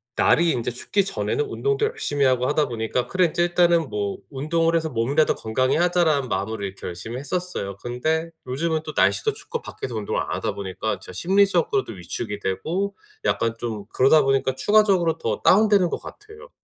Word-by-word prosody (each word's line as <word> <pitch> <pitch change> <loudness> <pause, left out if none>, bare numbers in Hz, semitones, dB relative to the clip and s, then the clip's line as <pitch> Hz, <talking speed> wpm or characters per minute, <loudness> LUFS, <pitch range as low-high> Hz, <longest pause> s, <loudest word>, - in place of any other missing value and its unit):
날이 170 +1 +4
인제 120 -2 -2
춥기 195 - -1
전에는 440 - -1
운동도 420 +2 0
열심히 145 - -1
하고 130 -1 +2
하다 150 0 +1
보니까 120 +1 -2
'그래. 185 -1 +2
이제 175 +3 -1
일단은 170 -3 +3
뭐 100 -1 -2
운동을 165 +4 0
해서 160 -1 0
몸이라도 135 +5 +1
건강히 130 +4 0
하자.'라는 170 -6 +2
마음으로 100 +1 -2
이렇게 95 0 -7
열심히 95 +7 -6
했었어요. 145 - -4
근데 155 +9 -2 0.2
요즘은 160 +5 -1
또 155 - -6
날씨도 100 0 +2
춥고 - - -6
밖에서 125 - -7
운동을 105 -2 -2
안 - - -5
하다 - - -2
보니까 95 -2 -3
진짜 - - -11
심리적으로도 180 - +2
위축이 100 +3 -5
되고 180 - -2 0.3
약간 115 0 +1
좀 110 -4 -4
그러다 135 +4 +5
보니까 135 -1 +1
추가적으로 185 0 +3
더 110 -8 -2
다운되는 205 -2 +5
것 - - -4
같아요. 435 +4 -12
145 Hz, 430 characters per minute, -23 LUFS, 115-175 Hz, 0.3 s, 그러다